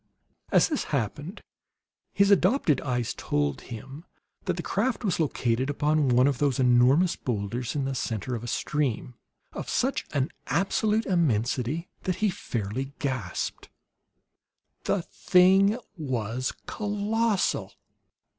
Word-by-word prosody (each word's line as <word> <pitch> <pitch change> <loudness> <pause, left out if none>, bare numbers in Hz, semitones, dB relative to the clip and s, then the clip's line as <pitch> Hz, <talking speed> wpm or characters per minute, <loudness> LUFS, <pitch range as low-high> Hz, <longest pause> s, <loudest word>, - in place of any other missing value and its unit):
As - - +5
this 300 - -1
happened, 145 - -3 0.7
his 200 0 +3
adopted 185 - +3
eyes 125 -3 -1
told 75 -2 -1
him 135 +6 -9 0.4
that 180 -2 -1
the 170 - -3
craft 240 +5 -1
was 190 -6 0
located 130 -4 0
upon 150 0 +2
one 125 +1 +5
of 140 -3 +1
those 140 -4 +2
enormous 130 +7 +4
boulders, 120 +2 -3
in 140 -2 0
the 135 - -2
center 120 -1 -3
of 115 -1 -4
a - - -5
stream 130 -2 -1 0.4
of - - -6
such 265 +2 0 0.4
absolute 210 +7 +1
immensity 140 - 0 0.2
that 185 - 0
he 210 +2 +1
fairly 125 - -4
gasped. 125 -10 -3 1.2
The 190 - +1
thing 190 +5 +4 0.2
was 130 - -2
colossal! 210 0 0
145 Hz, 120 wpm, -27 LUFS, 125-185 Hz, 1.2 s, As